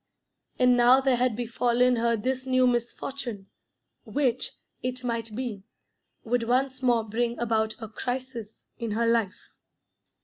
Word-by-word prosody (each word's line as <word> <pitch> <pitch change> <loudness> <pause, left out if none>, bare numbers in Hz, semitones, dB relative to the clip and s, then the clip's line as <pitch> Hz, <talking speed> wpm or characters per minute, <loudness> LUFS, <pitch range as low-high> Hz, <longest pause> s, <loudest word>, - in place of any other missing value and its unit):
And 250 -1 +5
now 245 +2 +6
there 265 -2 +2
had 250 -2 +1
befallen 240 +1 +2
her 230 0 +2
this 260 +4 -2
new 255 0 +4
misfortune, 240 -3 -3 0.5
which, 260 -4 -1 0.3
it 255 0 -4
might 230 -3 -3
be, 235 -5 -4 0.6
would 245 +1 0
once 260 +3 0
more 240 -3 +2
bring 235 +2 -1
about 220 -2 0
a 220 - -6
crisis 245 -1 -5
in 230 -3 -2
her 230 +2 +1
life. 230 -4 0
240 Hz, 135 wpm, -27 LUFS, 230-255 Hz, 0.6 s, now